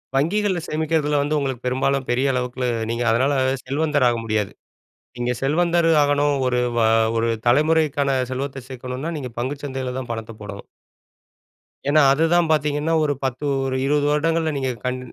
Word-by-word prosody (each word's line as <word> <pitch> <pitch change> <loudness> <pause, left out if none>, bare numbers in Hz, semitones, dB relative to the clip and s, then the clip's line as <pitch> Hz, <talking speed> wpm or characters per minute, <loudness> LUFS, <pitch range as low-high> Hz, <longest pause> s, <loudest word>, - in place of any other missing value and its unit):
வங்கிகள்ல 185 +6 +1
சேமிக்கறதுல 155 -2 0
வந்து 150 +1 0
உங்களுக்கு 130 -3 -3
பெரும்பாலும் 130 +1 0
பெரிய 130 +3 +2
அளவுக்கு, 125 0 -2 0.2
நீங்க 115 +1 -1
அதனால 130 +5 +2 0.3
செல்வந்தராக 140 -3 +1
முடியாது. 105 -2 -1 0.7
நீங்க 120 0 -1
செல்வந்தரு 170 +4 +2
ஆகணும், 145 0 +2
ஒரு 125 -1 +1 0.2
வ - - +3 0.4
ஒரு 115 +1 +1 0.2
தலைமுறைக்கான 145 0 +2
செல்வத்த 135 -1 -4
சேர்க்கணுன்னா 130 +5 -5
நீங்க 130 -4 -6
பங்குச்சந்தைல 130 -1 -4
தான் 120 -2 -6
பணத்த 115 0 -5
போடணும். 100 -1 -8 1.2
ஏன்னா, 155 +1 +5
அதுதான் 165 +3 +2
பாத்தீங்கன்னா 150 +1 +1
ஒரு 145 -1 +1
10, 130 +2 -3 0.2
ஒரு 130 0 -1
20 145 +1 +2
வருடங்கள்ல 160 +1 +1
நீங்க 130 -1 -1 0.2
கன் 125 0 -1
140 Hz, 140 wpm, -22 LUFS, 125-150 Hz, 1.2 s, ஏன்னா